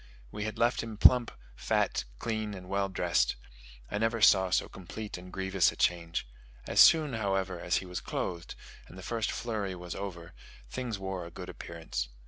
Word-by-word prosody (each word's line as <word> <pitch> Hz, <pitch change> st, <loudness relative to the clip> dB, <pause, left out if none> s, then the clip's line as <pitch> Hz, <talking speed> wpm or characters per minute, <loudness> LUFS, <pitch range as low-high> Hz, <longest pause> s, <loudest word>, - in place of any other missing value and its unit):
We 105 Hz, -, -4 dB
had 110 Hz, -, -4 dB
left 120 Hz, +1 st, +2 dB
him 115 Hz, -2 st, -7 dB
plump, 120 Hz, +2 st, +7 dB, 0.3 s
fat, -, -, 0 dB
clean, 110 Hz, -, -3 dB
and 90 Hz, -1 st, -10 dB
well 100 Hz, +1 st, 0 dB
dressed; 90 Hz, -2 st, +1 dB, 0.6 s
I 105 Hz, -, -1 dB
never 115 Hz, +1 st, +1 dB
saw 95 Hz, -3 st, +6 dB
so 95 Hz, -, +2 dB
complete 105 Hz, +4 st, -7 dB
and 90 Hz, 0 st, -9 dB
grievous 95 Hz, -2 st, +2 dB
a -, -, -11 dB
change. 85 Hz, -6 st, 0 dB, 0.4 s
As -, -, 0 dB
soon, 155 Hz, -4 st, +7 dB
however, 95 Hz, -4 st, -1 dB
as 90 Hz, +1 st, 0 dB
he -, -, 0 dB
was 90 Hz, -1 st, -5 dB
clothed, 85 Hz, -2 st, -4 dB, 0.3 s
and 95 Hz, -, -13 dB
the 95 Hz, -, -9 dB
first 115 Hz, +1 st, -1 dB
flurry 105 Hz, -5 st, -3 dB
was 90 Hz, -1 st, -6 dB
over, 90 Hz, -4 st, -6 dB, 0.3 s
things 120 Hz, -, -4 dB
wore 95 Hz, -2 st, -4 dB
a -, -, -9 dB
good 90 Hz, +2 st, -8 dB
appearance. 80 Hz, -8 st, -5 dB
95 Hz, 180 wpm, -30 LUFS, 90-110 Hz, 0.6 s, plump